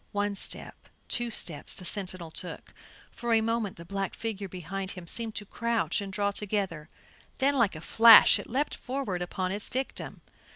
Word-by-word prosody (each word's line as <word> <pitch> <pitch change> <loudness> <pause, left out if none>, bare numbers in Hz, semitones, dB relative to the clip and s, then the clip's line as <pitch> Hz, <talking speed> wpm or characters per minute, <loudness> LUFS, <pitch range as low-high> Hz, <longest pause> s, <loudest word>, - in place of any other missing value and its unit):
One 205 0 0
step, 200 - -2 0.2
two 240 -1 0
steps 170 -8 -3
the 185 - -9
sentinel 185 -3 -4
took; 180 - -7 0.4
for 240 0 -4
a 225 - +5
moment 225 -3 -1
the 170 - -10
black 195 +2 -3
figure 205 -4 -4
behind 185 +2 -5
him 180 - -8
seemed 225 +5 -3
to 210 - -4
crouch 225 -5 -1
and 200 -1 -6
draw 200 +1 0
together, 195 -7 -2 0.5
then 280 +2 +3
like 230 -9 +2
a 155 - -7
flash 225 +4 +8
it - - -8
leaped 275 +5 0
forward 250 -9 -3
upon 185 +1 -2
its 205 +1 -3
victim. 260 +1 -4
200 Hz, 175 wpm, -29 LUFS, 185-230 Hz, 0.5 s, flash